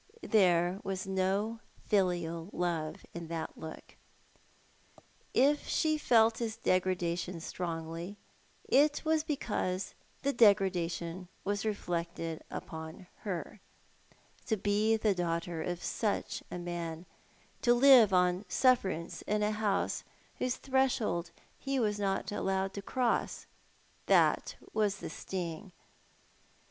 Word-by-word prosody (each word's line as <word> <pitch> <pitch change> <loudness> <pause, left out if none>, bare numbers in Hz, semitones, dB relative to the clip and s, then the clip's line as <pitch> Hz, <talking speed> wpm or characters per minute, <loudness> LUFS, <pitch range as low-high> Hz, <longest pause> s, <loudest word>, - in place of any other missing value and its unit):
There 180 -3 +3
was 190 -1 -3
no 195 +4 0 0.3
filial 175 -4 0
love 165 -3 -2
in 170 -1 -6
that 165 -1 -4
look. 160 0 -10 1.3
If 285 +3 +3
she 310 -1 +2
felt 225 -4 +4
his 225 -2 -3
degrada 185 -2 +1
tion 180 -1 -5
strongly 165 +2 -5 0.5
it 290 +3 +3
was 315 -1 +2
because 205 -10 -2 0.3
the 280 0 +1
degradation 185 -5 +2 0.2
was 205 +2 -1
reflected 170 -5 -3
upon 160 +3 -7
her. 190 0 -5 0.9
To 220 - +1
be 210 +3 +2
the 215 -2 +2
daughter 170 -2 -2
of 175 +1 -3
such 215 -3 -1
a - - -5
man, 170 -1 -5 0.6
to 240 - +4
live 250 -5 +8
on 180 +1 +2
sufi"erance 195 -10 +2
in 210 0 +1
a 210 - +2
house 210 -2 0 0.4
whose 255 0 0
threshold 255 -10 0 0.3
he 275 -1 -1
was 210 -3 0
not 195 -1 -1
allowed 195 -1 -1
to 200 - -5
cross! 245 +3 -1 0.6
That - - +3 0.2
was 210 -2 +1
the - - -7
sting 180 0 -5
190 Hz, 115 wpm, -32 LUFS, 170-220 Hz, 1.3 s, live